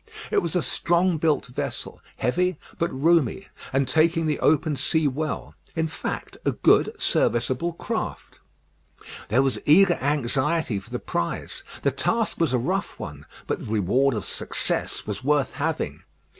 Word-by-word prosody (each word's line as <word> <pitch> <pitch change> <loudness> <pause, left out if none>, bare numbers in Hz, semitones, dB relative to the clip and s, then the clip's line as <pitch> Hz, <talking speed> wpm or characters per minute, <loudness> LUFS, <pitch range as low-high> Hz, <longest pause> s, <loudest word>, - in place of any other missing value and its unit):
It - - +3
was 170 +1 -2
a 175 - +2
strong 175 -1 +1
built 155 -2 +2
vessel, 125 - -5 0.2
heavy, 180 +6 +1 0.2
but 170 - +1
roomy, 165 - +2 0.2
and 135 0 +1
taking 160 +4 +3
the 150 -2 0
open 155 0 +3
sea 160 +2 +1
well; 150 +3 -3 0.2
in 160 - +1
fact, 160 - -5
a - - +1
good, - - +3
serviceable 130 +8 +1
craft. - - -4 0.9
There 125 +5 +4
was 135 -1 0
eager 175 +4 +5
anxiety 140 -2 0
for - - -16
the - - -2
prize; 85 - -3 0.2
the 140 - +3
task 225 - 0
was 165 -5 +2
a 130 - +3
rough 120 - -2
one, - - -8 0.2
but - - -2
the 105 - -7
reward 120 +6 +2
of 105 - -3
success - - -2
was 105 +4 -5
worth 145 -2 +2
having. - - -2
150 Hz, 155 wpm, -25 LUFS, 130-165 Hz, 0.9 s, eager